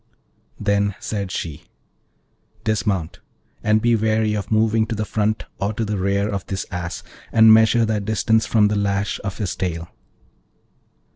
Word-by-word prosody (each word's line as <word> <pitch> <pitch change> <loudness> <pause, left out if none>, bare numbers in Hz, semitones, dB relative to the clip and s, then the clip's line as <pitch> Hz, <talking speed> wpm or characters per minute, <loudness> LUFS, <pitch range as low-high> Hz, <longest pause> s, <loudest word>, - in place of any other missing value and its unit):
Then 100 -1 +1
said 100 -3 -4
she, 80 -6 -5 1.0
'Dismount, 105 -6 -1 0.4
and 110 0 +2
be 120 0 +4
wary 110 0 +1
of 105 -1 -3
moving 110 0 +2
to 115 - -3
the 110 0 -2
front 110 +1 -1 0.2
or 100 +2 -1
to 110 +1 -2
the 105 -2 -2
rear 100 +2 +1
of 100 -3 -3
this 95 0 -3
Ass, 90 -1 -5 0.3
and 110 -1 +7
measure 110 +1 +5
thy 110 -1 0
distance 110 +2 +1
from 105 -2 +3
the 105 - 0
lash 100 0 -1
of 100 -1 -4
his 100 -5 -3
tail.' 85 -2 -3
105 Hz, 155 wpm, -21 LUFS, 100-110 Hz, 1.0 s, and